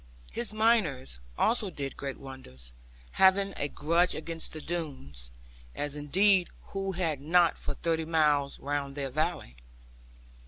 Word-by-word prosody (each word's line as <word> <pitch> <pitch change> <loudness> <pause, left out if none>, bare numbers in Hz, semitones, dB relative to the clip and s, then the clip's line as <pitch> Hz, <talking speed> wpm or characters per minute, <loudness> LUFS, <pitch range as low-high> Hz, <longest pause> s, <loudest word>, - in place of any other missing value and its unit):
His 235 -1 0
miners 215 - +2 0.2
also 225 -3 +2
did 140 -5 -5
great 140 -1 -5
wonders, 65 - -10 0.4
having 195 +1 +4
a 145 - -1
grudge 170 +5 +2
against 165 +1 -4
the 155 - -6
Doones; 135 - -5 0.5
as 145 0 -3
indeed 185 +6 +3 0.2
who 195 -1 -2
had 165 -6 -1
not 170 +3 +4
for - - -5
thirty 165 -1 0
miles 150 -3 +2
round 140 -1 -2
their 140 -2 -2
valley? 155 - -1
155 Hz, 130 wpm, -29 LUFS, 140-180 Hz, 0.5 s, having